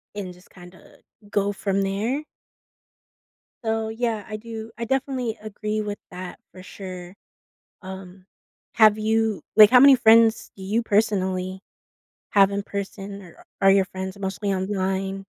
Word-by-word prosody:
and 190 -3 -6
just 180 +2 -20
kinda 180 0 -16 0.3
go 205 0 0
from 195 0 -1
there. 215 +9 -1 1.4
So, 220 -1 -1
yeah, 225 -2 -2
I 215 -1 -5
do 225 0 -8
I 235 - -3
definitely 260 -2 -2
agree 215 0 -4
with 205 -1 -5
that 180 0 -8
for 185 - -12
sure. 185 -1 -9 0.7
Um. 190 -1 -10 0.5
Have 215 -2 +6
you 220 -1 0
like, 215 -1 +9
how 250 0 +7
many 275 -1 +8
friends 225 -1 +4
do 190 - -11
you 215 +5 0
personally 190 -3 0 0.7
have 195 -1 +5
in 200 0 -2
person, 200 0 -6
or 175 -3 -16 0.2
are 195 - +6
your 195 0 +4
friends 190 +1 -7
mostly 195 0 -3
online? 195 0 -2
200 Hz, 140 wpm, -23 LUFS, 190-220 Hz, 1.4 s, like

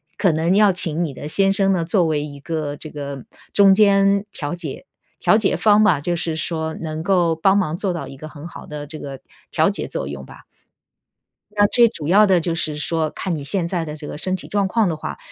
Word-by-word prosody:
可 190 - +2
能 165 +4 +1
要 205 -1 +5
请 170 -2 -1
你 155 - -3
的 145 - -8
先 195 +5 +3
生 195 -1 +2
呢 180 -3 +1
作 175 +2 +2
为 150 -2 0
一 145 -1 -9
个 150 0 -4
这 155 - -9
个， 145 -2 -6
呃， 135 - -10 0.3
中 200 -1 +6
间 200 0 +3
调 145 -3 -5
解 170 - -7 0.3
调 215 - +4
解 205 - +1
方 215 0 +4
吧， 180 -9 +3
就 175 +4 -2
是 165 -1 -1
说 160 0 -3
能 155 -1 -5
够 175 -2 +2
帮 195 +4 +3
忙 165 -6 0
做 190 +2 -2
到 170 - -5
一 - - -10
个 155 +3 -9
很 150 +2 -10
好 - - -11
的 150 -1 -7
这 155 +1 -9
个 135 -2 -8 0.3
调 - - +2
节 - - -5
作 - - -4
用 70 -1 -7
吧。 - - -14 1.1
那 205 0 +3
最 235 +2 +5
主 155 -9 -6
要 205 +5 +6
的 185 -4 +3
就 165 0 -2
是 155 -2 -2
说 160 +1 -1
看 180 -3 -3
你 145 - -6
现 170 +4 +1
在 170 -2 -2
的 150 - -6
这 150 -1 -9
个 - - -7
身 185 +4 -2
体 185 - -8
状 200 -1 0
况 215 0 +1
的 160 - -3
话， - - -6
170 Hz, 260 characters per minute, -20 LUFS, 155-195 Hz, 1.1 s, 中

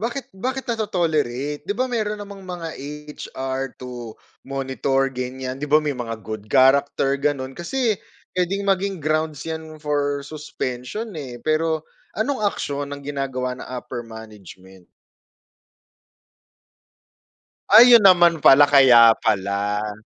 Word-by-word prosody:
bakit 240 +3 -4
bakit 255 +7 -4
nato-tolerate 155 - -1
'di 205 - 0
ba, 255 - +1
mayro'n 215 -4 -2
namang 200 -1 -9
mga 175 -3 -6 0.5
HR 135 0 -5
to 120 -3 -8 0.3
monitor 135 0 -1
ganyan, 130 +1 -5
'di 150 - -4
ba 150 - +5
may 150 -2 -2
mga 115 -3 -5
good 110 -1 -7
character 135 +1 +3
gano'n 140 -2 -1
kasi 215 - -2 0.3
puwedeng 185 +2 -1
maging 195 0 0
grounds 155 -1 -2 0.3
for 145 -1 -1
suspension, 150 - -6
eh, 135 -6 -7
pero 160 0 0 0.3
anong 255 +5 -1
aksyon 145 -6 -4
ang 145 0 -7
ginagawa 135 -3 -3
ng - - -9
upper 125 -1 -6
management? 105 -5 -13 2.8
Ayun 240 -1 +9
naman 175 -5 +5
pala, 145 +2 +8
kaya 125 -5 +7
pala. 105 +1 -1
145 Hz, 115 wpm, -22 LUFS, 125-180 Hz, 2.8 s, Ayun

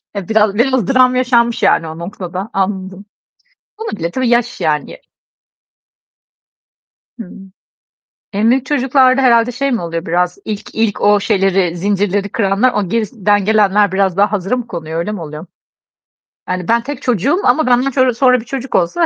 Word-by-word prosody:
Ya 195 -3 -5
biraz, 215 -2 +2
biraz 250 -2 +1
dram 255 -1 +3
yaşanmış 235 -2 +1
yani 165 - +2
o 160 +1 -8
noktada. 185 +2 -6
Anladım. 190 0 -3 0.7
Olabilir, 205 - -5
tabii 255 -2 -1
yaş 240 -2 0
yani. 155 - -2 2.2
Hı. 185 - -8 1.0
En 215 +4 +2
büyük 260 0 +1
çocuklarda 265 -1 +2
herhâlde 235 -1 +3
şey 275 +2 -2
mi 230 - -1
oluyor 165 0 -5
biraz, 180 +2 -1
ilk 210 -2 -6
ilk 225 -2 -1
o 205 0 +3
şeyleri, 195 -4 +1
zincirleri 200 +1 -1
kıranlar 205 +4 +1
o 200 -4 -1
gerisinden 205 -2 0
gelenler 210 -2 +2
biraz 190 -2 0
daha 205 +1 +2
hazıra 200 +4 -1
mı 240 -2 -5
konuyor, 165 -3 -6
öyle 210 +5 -3
mi 200 - -6
oluyor? 155 +2 -8 1.0
Yani 185 -1 -3
ben 235 0 +2
tek 285 0 -6
çocuğum 250 - 0
ama 260 +4 +2
benden 255 +1 +2
sonra 250 +1 +3
bir 225 - -10
çocuk 265 0 -5
olsa 330 - +1
210 Hz, 155 wpm, -15 LUFS, 190-250 Hz, 2.2 s, dram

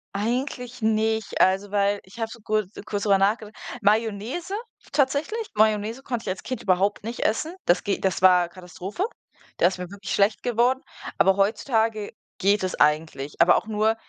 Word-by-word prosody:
Eigentlich 245 +2 -2
nicht, 220 0 0
also, 195 +2 +3
weil 200 0 +1
ich 195 +5 -15
habe 225 0 -2
so 235 - -10
kurz 215 -2 -1
kurz 205 -1 -3
drüber 200 -2 +4
nachgedacht 210 +2 0 0.3
Mayonnaise 225 - 0 0.4
tatsächlich, 300 - 0
Mayonnaise 215 +4 +1
konnte 240 -3 -3
ich - - -4
als 185 - -4
Kind 255 -3 -4
überhaupt 195 +2 +1
nicht 235 +1 -5
essen 310 +11 0
das 175 - +3
ge 200 - +1
das 190 -2 -1
war 180 -2 +5
Katastrophe, 185 - -5 0.5
da 175 - +4
ist 185 - -2
mir 180 -1 -6
wirklich 200 -1 -6
schlecht 200 +2 +2
geworden, 245 +2 +2 0.4
aber 195 0 +4
heutzutage 220 +1 +1 0.3
geht 200 +1 +2
es 185 - -1
eigentlich, 150 -2 +1
aber 170 +1 +6
auch - - -1
nur 220 +1 +1
210 Hz, 170 wpm, -25 LUFS, 195-230 Hz, 0.5 s, aber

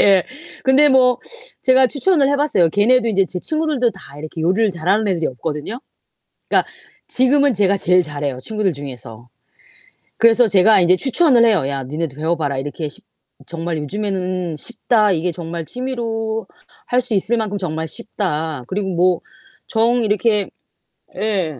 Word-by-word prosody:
예. 195 -3 +5 0.4
근데 270 +3 +5
뭐 255 -2 +4 0.4
제가 260 0 +5
추천을 290 +1 +2
해 285 - +2
봤어요. 280 - +2
걔네도 230 +7 +3
인제 195 -3 +2
제 180 - -5
친구들도 305 - 0
다 170 -6 -14
이렇게 155 +2 -7
요리를 190 +7 +2
잘하는 190 +5 0
애들이 175 -5 0
없거든요. 150 - -5 0.7
그러니까 - - +2 0.4
지금은 280 +2 +3
제가 200 -1 +2
제일 180 -1 +3
잘해요 145 -3 -4
친구들 210 +7 -1
중에서. 125 -5 -9 0.9
그래서 230 +1 +4
제가 200 +1 +5
인제 180 +1 +4
추천을 265 - +3
해요. 205 -12 +2
"야 140 -1 -3
니네도 150 +1 -4
배워 160 +3 -1
봐라. 145 -3 -2
이렇게 145 +3 -4
쉽 145 - -15 0.4
정말 170 0 -4
요즘에는 185 0 -3
쉽다. 215 +2 +1
이게 175 +1 -1
정말 170 -1 -6
취미로 225 -3 -4 0.4
할 250 - +2
수 245 - -3
있을 210 +4 +1
만큼 210 -2 -2
정말 160 -4 -3
쉽다. 160 - -4
그리고 195 +3 -2
뭐 180 0 +2 0.5
정 235 +1 +2
이렇게" 210 -1 +1 0.7
예. 185 -10 -2
195 Hz, 330 characters per minute, -19 LUFS, 160-235 Hz, 0.9 s, 예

